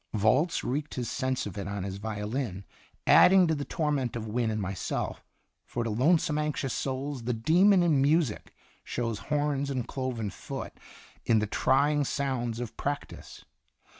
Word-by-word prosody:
Volz 125 - +2
wreaked 145 +4 -3
his 125 -2 -3
sense 130 0 -1
of 100 -1 -6
it 100 - -4
on 100 -1 -3
his 95 0 -4
violin, 105 -1 -4 0.4
adding 185 0 +7
to 160 - +1
the 145 -2 -2
torment 145 -6 -1
of 115 - -3
W 110 0 -6
r 125 - +2
ynne 115 - +1
and 110 - -2
myself, 95 -1 -3 0.4
for 120 - -3
to 115 - -2
lonesome 150 +6 +2
anxious 150 -3 -1
souls 135 -1 -3
"the 125 - 0
demon 175 - +4
in 155 -6 +3
music" 145 -4 +1 0.3
shows 115 -3 -3
horns 145 -1 0
and 130 -4 -2
cloven 125 -6 -3
foot - - -7 0.5
in 115 - +3
the 105 - +2
trying 145 +7 +2
sounds 125 -4 -2
of 120 -3 -5
practice. 145 +1 -5
130 Hz, 165 wpm, -28 LUFS, 110-145 Hz, 0.5 s, adding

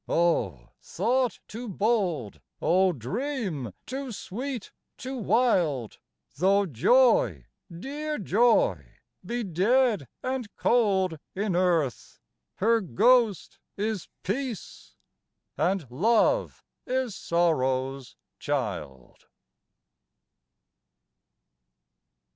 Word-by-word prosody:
O 110 - +1
thought 245 +6 0
too 230 +2 -7
bold, 180 - -1 0.2
O 185 +2 +3
dream 180 - -3
too 265 0 -5
sweet, 240 +3 -5 0.3
too 260 +1 -6
wild? 190 - +1 0.4
Though 195 +5 +3
joy 140 - +3 0.3
dear 290 - -4
joy 240 - +3 0.4
be 240 0 -3
dead 205 - +2 0.2
and 255 -3 -2
cold 190 -8 +2 0.2
in 200 -1 -1
earth, 170 -8 0 0.4
Her 225 +3 +2
ghost 215 - +2 0.2
is 210 -2 -2 0.2
peace, 200 - -5 0.6
and 190 -3 0
love 225 - +2 0.2
is 255 -3 -1
sorrow's 135 -6 0 0.2
child. 65 -4 -4
195 Hz, 80 wpm, -27 LUFS, 160-245 Hz, 0.6 s, O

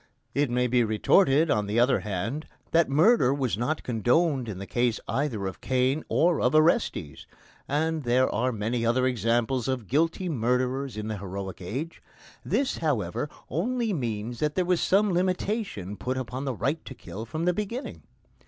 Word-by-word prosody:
It 145 -1 +1
may 125 +1 +1
be 125 0 +3
retorted, 140 - +3
on 105 -2 +1
the 105 +3 +1
other 125 -2 +4
hand, 105 - -3 0.2
that 165 -2 +3
murder 155 - +4
was 130 -7 0
not 130 +8 -2
condoned 125 - +1
in 100 - -5
the 100 - -6
case 120 +1 0
either 115 -4 -1
of 95 -2 -5
Cain 130 +4 +1
or 170 -1 +2
of 125 +4 +2
Orestes, 155 - +1 0.4
and 160 +2 0
there 125 0 +3
are 125 +2 +1
many 115 +2 -2
other 120 +3 +2
examples 120 +1 +1
of 130 -4 -2
guilty 165 - 0
murderers 125 -2 -1
in 105 0 -4
the 110 -2 -4
heroic 95 0 -6
age. 135 - -5 0.4
This, 275 -1 0
however, 140 - -1 0.2
only 230 +5 -1
means 120 - -3
that 150 -1 0
there 185 - +1
was 180 -1 +1
some 200 0 +3
limitation 180 - -1
put 130 +5 -3
upon 130 +1 -4
the 130 -3 -2
right 145 +8 -1
to 130 - -8
kill 100 +5 -8
from 160 +7 -3
the 180 - +3
beginning. 210 +7 -4
130 Hz, 170 wpm, -27 LUFS, 115-160 Hz, 0.4 s, other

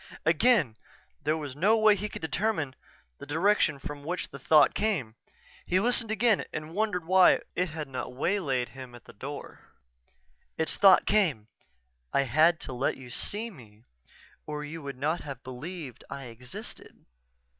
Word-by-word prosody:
_" - - -12
Again 165 - +3 0.4
there 155 +2 +1
was 145 -4 -6
no 205 +9 +4
way 215 -1 +6
he 210 +2 -4
could - - -8
determine 160 -5 -1 0.5
the - - -9
direction 160 0 +2
from 145 +1 -7
which 175 +4 -3
the 140 - -9
thought 150 +2 +5
came. 180 - -1 0.5
He 185 - +1
listened 235 +1 +1
again, 220 0 +2
and 155 +1 -6
wondered 200 -4 -1
why 185 +1 +6
it 180 0 0
had 155 -1 -5
not 130 -1 -5
waylaid 135 -6 0
him 130 -2 -10
at 120 - -14
the - - -13
door. 140 +7 -8 1.0
Its 160 - 0
thought 195 -2 +6
came: 155 - +1 0.7
"_I 140 - +3
had 160 +7 +4
to - - -6
let 125 +2 -1
you 125 -2 -11
see 220 - -3
me 110 - -16 0.6
or 150 -1 -4
you 160 +2 -7
would 140 -2 -7
not 155 +6 -1
have 135 -3 -8
believed 135 +2 -7
I 140 - -6
existed. 125 0 -10
155 Hz, 165 wpm, -28 LUFS, 135-190 Hz, 1.0 s, way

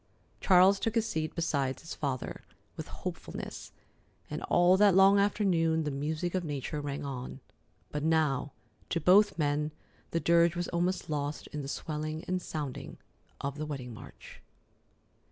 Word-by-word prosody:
Charles 190 +1 +6
took 225 +2 -1
his 230 -1 +2
seat 155 -7 -2
beside 140 -6 0
his 165 - -8
father 135 -4 -3 0.3
with - - -6
hopefulness, - - -7 0.6
and - - -3
all 175 +1 +5
that 200 -1 +5
long 195 +1 +7
afternoon 175 -6 +2
the 150 - -2
music 155 +5 -2
of 185 -1 0
nature 145 -1 -3
rang 145 0 -4
on; 130 -1 -6 0.5
but 150 - -2
now 155 -4 +1 0.4
to 170 - 0
both 195 +5 +5
men 150 -1 +1 0.4
the 165 - 0
dirge 170 +2 +4
was 175 0 -2
almost 175 +1 -1
lost 145 -1 -3
in 150 - -3
the 135 - -6
swelling 155 +2 -4
and 185 0 -2
sounding 150 -6 -5 0.4
of 140 +1 -4
the 155 - -2
wedding 130 -5 -5
march. 110 - -12
160 Hz, 155 wpm, -30 LUFS, 145-180 Hz, 0.6 s, long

